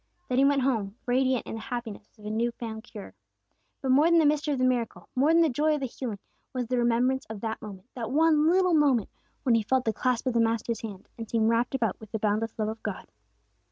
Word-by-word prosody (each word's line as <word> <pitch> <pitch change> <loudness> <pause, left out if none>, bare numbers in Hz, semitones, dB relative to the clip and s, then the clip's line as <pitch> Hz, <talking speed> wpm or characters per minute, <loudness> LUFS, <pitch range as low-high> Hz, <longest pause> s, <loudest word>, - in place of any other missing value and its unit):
Then 255 0 +2
he 275 - +5
went 280 -1 +3
home, 220 -7 0
radiant 255 0 +1
in - - -6
the 225 - -5
happiness 230 -3 -7
of 210 - -17
his 210 +1 -4
new 235 +2 +1
found 220 -2 -7
cure. 210 - -10 0.7
But 265 - +1
more 295 +5 +5
than 340 - +5
the 320 - +5
mystery 300 +1 +2
of 280 - 0
the 255 - +2
miracle, 245 -2 -1
more 280 +5 +3
than 335 0 +5
the 325 - +3
joy 300 +4 +1
of - - -3
the 270 - -2
healing, 240 -3 -5 0.4
was 250 -2 -2
the 250 +1 -1
remembrance 240 +3 +1
of 215 -2 -7
that 225 -1 -3
moment, 200 -1 -10
that 230 -3 -5
one 310 +2 +4
little 365 0 +3
moment, 280 -8 +3 0.3
when 250 - +3
he 230 - +4
felt 255 +4 0
the 220 - +1
clasp 250 +2 0
of 255 - 0
the 235 - +2
Master's 230 0 0
hand, 205 -4 -8
and 225 - -6
seemed 225 -1 +2
wrapped 235 +3 +1
about 225 -7 -1
with 215 -2 -13
the 220 - -1
boundless 215 +1 -1
love 215 -1 -1
of 220 +1 -6
God. - - -6
240 Hz, 250 wpm, -27 LUFS, 220-270 Hz, 0.7 s, he